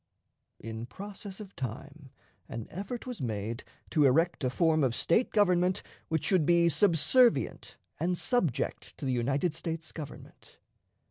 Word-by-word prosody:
In 115 +1 -6
process 200 - -9
of 200 -2 -10
time, 135 +4 -7 0.4
an 115 -2 -5
effort 200 +7 -5
was 250 -3 -6
made 115 0 -3 0.3
to 155 -3 +4
erect 160 +4 +3
a 130 - +2
form 160 +3 +2
of 125 -3 +1
State 220 +9 +2
government 185 -3 +3 0.2
which 160 -2 -1
should 185 -5 +3
be 170 +1 +4
subservient 200 - +3 0.2
and 180 +1 0
subject 165 - -1
to - - -6
the 130 - +1
United 135 +7 0
States 165 0 -5
Government. 150 -4 -10
165 Hz, 140 wpm, -30 LUFS, 135-185 Hz, 0.4 s, to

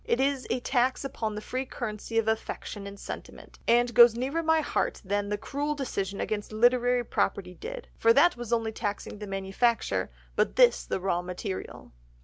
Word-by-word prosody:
It 235 - 0
is 270 -1 +1
a - - 0
tax 255 +1 +1
upon 225 -5 -3
the 210 - -4
free 255 +1 -2
currency 225 -1 -4
of 225 -1 +2
affection 220 -2 -3
and 200 0 -9
sentiment, - - -9
and 240 +1 +4
goes 235 -1 +8
nearer 270 +7 -1
my 320 0 +3
heart - - -1
than 205 +1 -1
the 205 - -1
cruel 290 +7 -2
decision 200 -8 -3
against 210 -1 -3
literary 245 +2 +3
property 185 -4 -1
did, 485 - -7
for 230 - +5
that 345 +7 +5
was 240 -2 -7
only 225 -1 +1
taxing 205 -1 -4
the 210 - -6
manufacture, 195 +5 0 0.3
but - - +1
this - - +5
the - - -1
raw 180 -2 0
material." 180 +2 -6
230 Hz, 180 wpm, -28 LUFS, 205-255 Hz, 0.3 s, goes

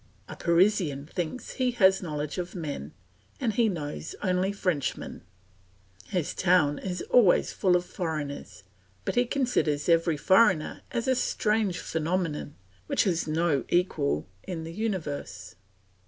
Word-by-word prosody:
A - - -8
Parisian 170 -5 +2
thinks 175 +8 -4
he 255 -2 0
has 190 -4 +4
a - - -8
knowledge 150 +1 -3
of 180 +1 -5
men 145 - -5 0.5
and 230 -4 0
he 225 +1 +3
knows 155 -4 -5
only 185 0 +1
Frenchmen; 180 -8 -2 0.9
his 180 -5 -2
town 175 -6 +3
is 180 -2 -4
always 225 -8 +4
full 185 -2 +3
of 175 0 +1
foreigners, 150 - -5 0.4
but - - -1
he 245 +1 +3
considers 240 - 0
every 165 -2 +3
foreigner 185 -1 +3
as 235 +1 -2
a 260 - +4
strange 215 -6 0
phenomenon 160 -3 -2 0.3
which - - +2
has 175 -5 0
no 155 -2 +1
equal 75 - +1
in 170 -3 -5
the 165 +1 -7
universe. 150 - -4
175 Hz, 140 wpm, -27 LUFS, 150-195 Hz, 0.9 s, has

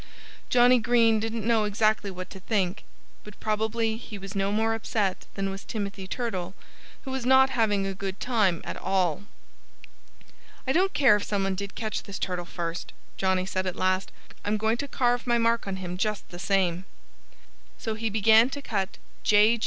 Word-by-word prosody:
Johnnie 245 0 +6
Green 230 -1 +4
didn't 225 0 -3
know 225 -2 +3
exactly 210 0 +1
what 185 -1 -7
to 190 - -9
think. 190 -2 -1 0.4
But 210 -1 -13
probably 220 +1 0
he 220 -2 -8
was 195 0 -8
no 195 0 +1
more 220 +2 +1
upset 210 -4 -1
than 195 -1 -1
was 195 0 -7
Timothy 200 -3 -5
Turtle, 190 -5 -3 0.5
who 265 - -6
was 265 -1 -2
not 265 +1 +5
having 210 -5 +1
a 195 - -2
good 195 0 -5
time 210 -9 +1
at - - -5
all. 190 -1 0 1.4
"I 265 - +1
don't 375 +6 +2
care 255 -7 +6
if 205 - -5
some 200 -2 -1
one 195 0 0
did 200 +1 -5
catch 220 -2 -3
this 200 -2 -7
turtle 180 -2 -2
first," 170 -1 -5 0.2
Johnnie 190 -1 +1
said 185 0 -2
at 185 - -2
last. 185 +1 0 0.3
"I'm 210 +1 0
going 220 +2 +1
to 285 - -4
carve 245 -2 0
my 240 0 +3
mark 230 -1 +1
on 195 - -2
him 180 -1 -5
just 210 0 -1
the 175 - -9
same." 185 -2 +1 0.9
So 220 - -3
he 220 +1 -2
began 220 +3 +5
to 285 +1 -5
cut 195 -6 -2 0.2
"J. 215 +3 +5
210 Hz, 185 wpm, -27 LUFS, 190-230 Hz, 1.4 s, Johnnie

